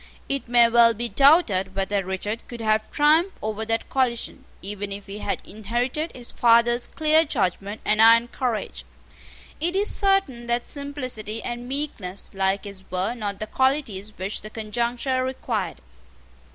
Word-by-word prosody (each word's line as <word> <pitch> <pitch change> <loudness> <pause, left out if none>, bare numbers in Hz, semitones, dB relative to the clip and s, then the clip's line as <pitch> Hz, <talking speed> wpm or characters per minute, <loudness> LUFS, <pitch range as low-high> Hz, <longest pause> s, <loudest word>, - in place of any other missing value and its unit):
It 275 -2 -2
may 240 0 +6
well 230 0 +5
be 235 +2 -4
doubted 230 - +4
whether 195 0 0
Richard 190 +4 -4
could 240 - -8
have 215 -1 +1
triumphed 315 +6 +3
over 215 0 -3
that 225 0 -1
coalition, 250 -3 -1
even 205 +1 -5
if 200 0 -6
he 200 +1 -8
had - - -3
inherited 240 - -2
his 245 -2 -6
father's 240 +1 +3
clear 315 +1 +3
judgment 200 - -2
and 215 +1 +3
iron 230 +1 +7
courage. 240 -3 -3 0.8
It 345 +4 -1
is 405 +2 +3
certain 390 - +1
that 240 0 0
simplicity 255 -7 -5
and 240 0 -5
meekness 245 -10 -4
like 195 0 0
his 200 -2 -9
were 185 +5 -1
not 205 -4 -4
the 215 - -3
qualities 225 -5 -1
which 190 +3 -3
the 215 - -8
conjuncture 240 +4 -2
required. 230 -8 -3
230 Hz, 150 wpm, -24 LUFS, 205-260 Hz, 0.8 s, iron